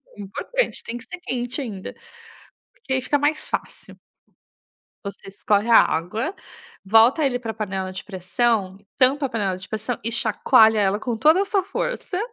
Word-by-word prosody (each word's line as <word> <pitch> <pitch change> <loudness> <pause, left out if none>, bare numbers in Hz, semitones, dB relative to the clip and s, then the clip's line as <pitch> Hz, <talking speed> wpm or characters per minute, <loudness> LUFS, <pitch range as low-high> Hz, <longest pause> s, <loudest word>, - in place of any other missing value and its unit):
é - - -17
importante, - - -3
tem 235 - -5
que 240 - -11
ser 360 +8 -9
quente 245 -1 -3
ainda, 205 -8 -6 0.8
porque 465 - -5
aí 260 - +1
fica 290 +3 0
mais 300 +2 0
fácil. - - -5 1.1
Você 200 -1 -8
escorre 205 +3 0
a 230 - +9
água, 220 - 0 0.5
volta 225 +9 +5
ele 250 -2 +1
pra 225 -3 -5
panela 190 -3 -4
de 185 - -7
pressão, 195 +1 -1 0.2
tampa 275 +2 +3
a - - -6
panela 195 -5 -1
de 185 0 -10
pressão 220 +3 -4
e 230 - -2
chacoalha 220 -2 +4
ela 200 +1 +1
com 235 -1 -2
toda 315 - +4
a - - +2
sua 395 -2 +1
força. 395 -1 -3
230 Hz, 170 wpm, -22 LUFS, 200-270 Hz, 1.1 s, a